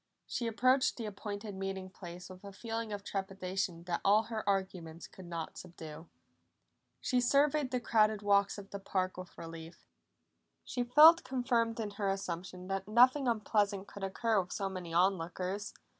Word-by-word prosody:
She 240 - -2
approached 255 +4 +3
the 230 - -4
appointed 205 0 -6
meeting 190 0 -4
place 175 -1 -9
with 185 +1 -12
a 200 - -8
feeling 225 +2 -4
of 205 -1 -4
trepidation 190 -3 -3
that 175 -1 -2
all 210 +3 +5
her 225 -2 -4
arguments 180 -4 -2
could 185 -2 -12
not 165 -2 -5
subdue. 160 -2 -10 0.9
She 250 -3 +1
surveyed 285 +2 +3
the 250 -1 0
crowded 215 -3 +2
walks 200 -1 +3
of 200 -1 -10
the 200 - -5
park 185 -1 -1
with 185 -1 -10
relief; 165 0 -9 0.8
she 245 - -2
felt 305 +7 +8
confirmed 240 -3 0
in 215 -2 -3
her 200 -1 -2
assumption 185 -1 -4
that 195 0 -3
nothing 255 +5 +5
unpleasant 205 -3 +1
could 200 - -9
occur 210 +2 +1
with 180 - -10
so 195 - -1
many 180 -3 -6
on 185 +2 +3
lookers. 185 +5 -4
200 Hz, 165 wpm, -33 LUFS, 185-230 Hz, 0.9 s, felt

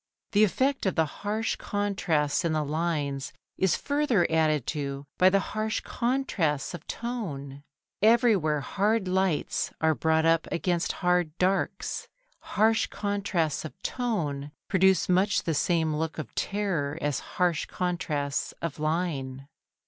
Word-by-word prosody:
The 210 -1 +5
effect 265 +4 +1
of 190 - 0
the 160 - +3
harsh 210 +8 -2
contrasts 190 -8 0
in 165 -2 +1
the 155 -1 0
lines 145 -3 -2 0.3
is 190 -3 +3
further 285 -11 +1
added 155 -4 +2
to 140 -2 -4
by 185 - +7
the 195 +1 +3
harsh 215 0 -1
contrasts 230 - -1
of 175 - -8
tone: 145 - -5 0.4
everywhere 210 -9 +4
hard 205 +6 0
lights 185 -3 0
are 160 0 +3
brought 160 +1 +2
up 165 0 +3
against 175 +1 0
hard 180 -2 +2
darks. 190 +1 0 0.3
Harsh 220 +2 +2
contrasts 200 -6 -1
of 160 +4 -9
tone 155 - -2 0.2
produce 190 0 +3
much 200 +3 +2
the 165 - 0
same 160 +1 +1
look 160 +1 -2
of 155 -7 -6
terror 180 -8 -1
as 145 -4 -1 0.2
harsh 175 -4 +2
contrasts 155 -6 -2
of 165 -3 -4
line. 150 -5 -2
170 Hz, 135 wpm, -27 LUFS, 150-205 Hz, 0.4 s, by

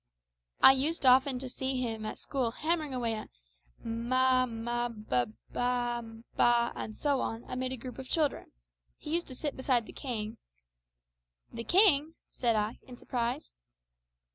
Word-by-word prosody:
I - - +11
used 280 +3 0
often 260 +1 +5
to 260 +1 -4
see 260 +1 -2
him 225 -3 -3
at - - -5
school 260 -4 -1
hammering 310 +4 -1
away 240 -3 -1
at 215 - -6 0.6
m 230 +1 -4
a, 255 0 +4
ma 240 +1 -2
b 215 -2 -11
a, 125 -1 +4 0.3
ba, 240 -1 0
and 215 - -5
so 285 -2 +1
on, 225 +1 -3
amid 255 0 -3
a 260 - -3
group 250 +2 -8
of 260 - -8
children. 305 -3 0 0.5
He 300 - -6
used 345 +1 0
to 260 - -8
sit 295 +2 -3
beside 255 -3 +1
the - - -11
king 220 -5 -4 0.6
" - - -41
"The 230 0 -5
king!" 330 -5 +5 0.2
said 235 -3 +1
I, 215 +1 -1
in 250 -2 -12
surprise. 245 +5 -3
250 Hz, 165 wpm, -30 LUFS, 230-265 Hz, 0.6 s, I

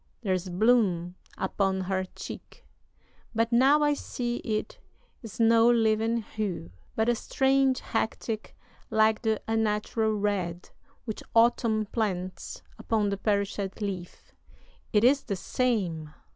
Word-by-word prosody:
there's 185 -2 -1
bloom 185 -3 +2 0.2
upon 190 0 0
her 185 0 -1
cheek; - - -9 0.7
But 230 +1 +1
now 270 +5 +5
I 295 0 +3
see 240 -4 -3
it 215 -2 -3 0.4
is 225 -4 -10
no 230 0 +5
living 225 0 +2
hue, 200 - -4 0.2
But 220 +1 +1
a 240 - +4
strange 265 +2 +2
hectic 225 -1 -3 0.3
like 220 0 +3
the 220 -2 +1
unnatural 220 0 0
red 190 -4 -2 0.3
Which 220 -3 -5
Autumn 230 -2 +3
plants 185 -5 -3 0.2
upon 215 -3 0
the 200 - -2
perish'd 200 -1 -1
leaf. 190 -4 -6 0.6
It 210 -1 +3
is 270 +3 +5
the 200 - -3
same! 185 -9 -1
215 Hz, 120 wpm, -28 LUFS, 195-230 Hz, 0.7 s, now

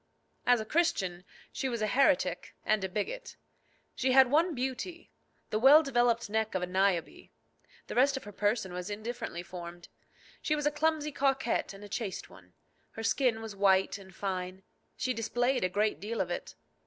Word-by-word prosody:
As 245 -1 +5
a 220 - -4
Christian 190 - 0 0.3
she 265 - -2
was 235 -2 -3
a - - +3
heretic 250 - +2
and 215 -2 +2
a 190 - -2
bigot. 475 - -4 0.6
She 260 -1 +1
had 265 -1 +7
one 325 +3 +3
beauty 265 +7 -4 0.4
the 215 - +1
well 285 +6 +8
developed 240 -4 +2
neck 220 0 -1
of 185 - 0
a - - +1
Niobe. 185 -2 0 0.6
The - - -7
rest 270 +2 +3
of - - -7
her 205 - -9
person 205 -2 0
was 180 +2 -5
indifferently 215 -4 -5
formed. 175 -1 -9 0.5
She 305 - +1
was 295 -1 -2
a 295 - +3
clumsy 300 0 0
coquette 270 -3 0
and 195 +1 -11
a - - -8
chaste 200 -2 -4
one. 90 -1 -17 0.4
Her 225 - -6
skin 225 0 +1
was 220 -2 -7
white 195 0 +3
and 190 -1 -13
fine; 185 -1 -4 0.3
she 255 - 0
displayed 245 +2 0
a 185 - +2
great 210 -3 0
deal 220 +5 -4
of 175 -2 -1
it. - - -5
220 Hz, 180 wpm, -30 LUFS, 190-265 Hz, 0.6 s, well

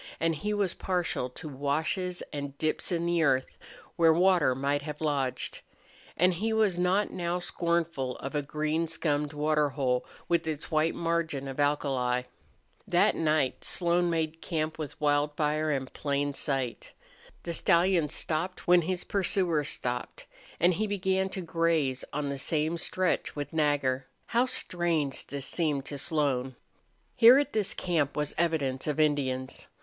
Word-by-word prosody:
And 165 0 +2
he 205 +8 -3
was 200 -4 0
partial 175 -8 -1
to 125 - -9
washes 155 +6 -1
and 140 -1 -5
dips 155 +4 -1
in 170 -1 0
the 170 -1 +2
earth 130 -4 +1 0.4
where 165 -2 +6
water 175 -5 +4
might 140 +2 0
have 150 0 -6
lodged. 140 -4 -1 0.6
And 180 +2 +4
he 215 +6 -1
was 215 -5 +2
not 185 +3 +2
now 175 0 -2
scornful 170 -7 -1
of 135 - -6
a 150 - +1
green 155 +3 -1
scummed 150 -2 -1
water 150 0 +1
hole 130 -3 0 0.2
with 170 -2 +1
its 155 +1 -4
white 155 +1 +2
margin 165 -5 -1
of 135 +1 -6
alkali. 135 -4 +1 0.6
That - - +3
night 155 -4 +1
Slone 175 0 +2
made 160 -1 -1
camp 155 -2 -2
with 150 -2 -6
Wildfire 150 +1 +1
in 135 -3 0
plain 140 +1 -2
sight. 135 -5 -3 0.5
The 170 - -3
stallion 170 -2 +3
stopped 165 +4 -2
when 175 0 +6
his 180 +2 -2
pursuers 180 -6 +1
stopped. 125 0 -4 0.3
And 175 +2 +4
he 215 +5 -1
began 190 -1 0
to 190 - -4
graze 165 -6 0
on 145 0 -2
the 140 -1 -3
same 155 +4 0
stretch 185 +1 -1
with 145 0 -5
Nagger. 145 -4 +1 0.2
How 245 +2 +2
strange 170 - -1
this 140 -1 -5
seemed 145 -2 0
to 145 -1 -5
Slone! 135 -4 0 0.6
Here 235 +3 +8
at 290 0 0
this 210 -3 +1
camp 155 -6 0
was 150 0 -1
evidence 150 -6 0
of 150 0 -1
Indians. 135 -4 0
155 Hz, 155 wpm, -29 LUFS, 140-175 Hz, 0.6 s, Here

